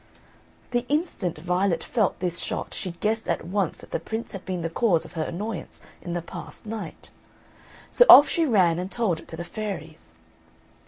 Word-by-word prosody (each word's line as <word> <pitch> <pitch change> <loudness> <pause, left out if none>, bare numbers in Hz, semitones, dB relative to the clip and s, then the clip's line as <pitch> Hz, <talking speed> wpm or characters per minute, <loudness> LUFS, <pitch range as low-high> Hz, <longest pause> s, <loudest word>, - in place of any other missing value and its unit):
The 240 -1 +1
instant 290 - -1
Violet 180 +2 0
felt 215 -8 0
this 175 -2 -2
shot - - -4
she 190 - -5
guessed 220 +5 -1
at - - -1
once 190 -1 -1
that - - -15
the - - -1
Prince 220 +7 -5
had 195 - -7
been 180 -3 -3
the 165 - -1
cause 180 -4 +2
of - - -12
her 160 - -2
annoyance 205 +1 -5 0.2
in 175 - -5
the 175 -1 -2
past 175 +2 -10
night; 215 -5 -7 0.8
so - - +6
off 290 - +12
she 335 - +1
ran 180 -8 +3
and 185 +2 -4
told 200 -9 0
it - - -14
to 165 - -8
the 175 - -4
fairies. 175 - -7
185 Hz, 190 wpm, -25 LUFS, 170-220 Hz, 0.8 s, off